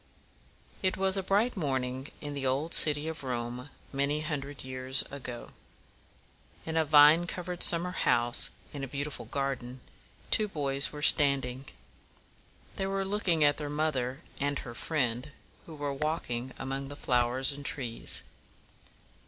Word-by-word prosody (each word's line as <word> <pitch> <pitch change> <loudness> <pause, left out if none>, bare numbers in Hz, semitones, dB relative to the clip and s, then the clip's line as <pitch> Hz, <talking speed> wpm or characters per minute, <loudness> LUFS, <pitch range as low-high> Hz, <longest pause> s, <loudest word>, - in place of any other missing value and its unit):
It 185 -1 +1
was 190 0 +2
a 195 - +2
bright 205 +6 +1
morning 130 -5 -2
in 145 -1 -5
the 140 -1 -5
old 140 +6 -1
city 150 0 +6
of 160 -2 -5
Rome 125 +1 -4 0.2
many 140 +2 0
hundred 145 -3 -4
years 130 0 0
ago. 125 -4 -7 1.1
In 160 - -4
a 160 - +3
vine 155 +3 +6
covered 180 0 -5
summer 175 +1 +5
house 120 -9 +2 0.2
in 140 -2 -6
a - - -3
beautiful 140 -1 -5
garden, 130 0 -3 0.5
two 215 -1 +3
boys 140 -6 +1
were 150 0 -7
standing. 135 -3 +3 1.1
They 195 - -1
were 195 0 -1
looking 190 -5 +1
at 145 0 +4
their 150 -1 -4
mother 145 -3 -1 0.2
and 145 0 0
her 120 - -7
friend, 125 -1 -2 0.3
who 160 - -9
were 145 -1 -3
walking 135 -4 -3
among 135 +1 -4
the 145 - -8
flowers 125 0 +1
and 145 0 -7
trees. 125 -5 -3
145 Hz, 145 wpm, -30 LUFS, 130-160 Hz, 1.1 s, city